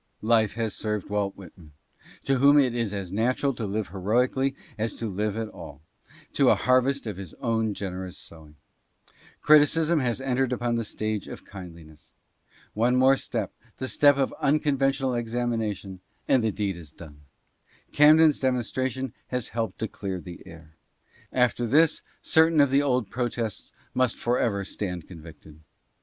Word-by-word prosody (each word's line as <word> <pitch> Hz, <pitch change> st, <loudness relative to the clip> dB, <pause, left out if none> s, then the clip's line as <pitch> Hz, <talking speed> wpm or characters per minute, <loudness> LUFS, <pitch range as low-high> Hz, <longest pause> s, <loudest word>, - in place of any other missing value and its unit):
Life 110 Hz, -2 st, +2 dB
has 115 Hz, -2 st, -2 dB
served 105 Hz, -2 st, -3 dB
Walt 100 Hz, -1 st, -1 dB
Whitman, 85 Hz, -5 st, -14 dB, 0.5 s
to 135 Hz, -1 st, +1 dB
whom 140 Hz, +2 st, +6 dB
it 130 Hz, -4 st, +4 dB
is 115 Hz, -4 st, -1 dB
as 100 Hz, -3 st, -5 dB
natural 125 Hz, +6 st, 0 dB
to 115 Hz, -3 st, -4 dB
live 105 Hz, +1 st, -3 dB
heroically 125 Hz, +8 st, 0 dB, 0.2 s
as 110 Hz, +1 st, -3 dB
to 115 Hz, -, -5 dB
live 105 Hz, +1 st, -2 dB
at 115 Hz, -1 st, -2 dB
all, 75 Hz, -7 st, -11 dB, 0.5 s
to -, -, +4 dB
a -, -, +6 dB
harvest 130 Hz, +2 st, +2 dB
of 105 Hz, -5 st, -5 dB
his 95 Hz, -5 st, -9 dB
own 110 Hz, -4 st, -1 dB
generous 95 Hz, -2 st, -5 dB
sowing. 80 Hz, -2 st, -12 dB, 0.9 s
Criti 155 Hz, 0 st, +8 dB
cism 165 Hz, 0 st, +1 dB
has 120 Hz, -1 st, -1 dB
entered 135 Hz, -1 st, 0 dB
upon 120 Hz, -1 st, -1 dB
the 115 Hz, -, -1 dB
stage 110 Hz, -1 st, -3 dB
of -, -, -9 dB
kindliness. 85 Hz, -5 st, -12 dB, 0.6 s
One 120 Hz, +4 st, +2 dB
more 130 Hz, +1 st, +5 dB
step 115 Hz, -6 st, -4 dB
— 115 Hz, -, -31 dB
the 130 Hz, -, -3 dB
step 145 Hz, +1 st, +4 dB
of 135 Hz, -1 st, 0 dB
unconventional 135 Hz, -2 st, +1 dB
examination 115 Hz, -5 st, -3 dB
— -, -, -42 dB
and 130 Hz, -3 st, +3 dB
the 110 Hz, -, +2 dB
deed 100 Hz, -3 st, -2 dB
is 80 Hz, -4 st, -11 dB
done. 75 Hz, -3 st, -13 dB, 0.7 s
Camden's 155 Hz, +1 st, +6 dB
demonstration 130 Hz, 0 st, -1 dB
has 125 Hz, -2 st, -3 dB
helped 110 Hz, -4 st, -3 dB
to 110 Hz, -, -2 dB
clear 95 Hz, -3 st, -5 dB
the 90 Hz, 0 st, -10 dB
air. 80 Hz, -2 st, -14 dB, 0.5 s
After 125 Hz, -1 st, +1 dB
this 155 Hz, +6 st, +3 dB, 0.2 s
certain 160 Hz, 0 st, +4 dB
of 140 Hz, -2 st, +4 dB
the 140 Hz, +1 st, +4 dB
old 125 Hz, -7 st, 0 dB
protests 120 Hz, -3 st, -3 dB, 0.2 s
must 130 Hz, -2 st, +1 dB
forever 115 Hz, -5 st, 0 dB
stand 90 Hz, -4 st, -5 dB
convicted. 80 Hz, -3 st, -13 dB
115 Hz, 160 wpm, -26 LUFS, 100-130 Hz, 0.9 s, Criti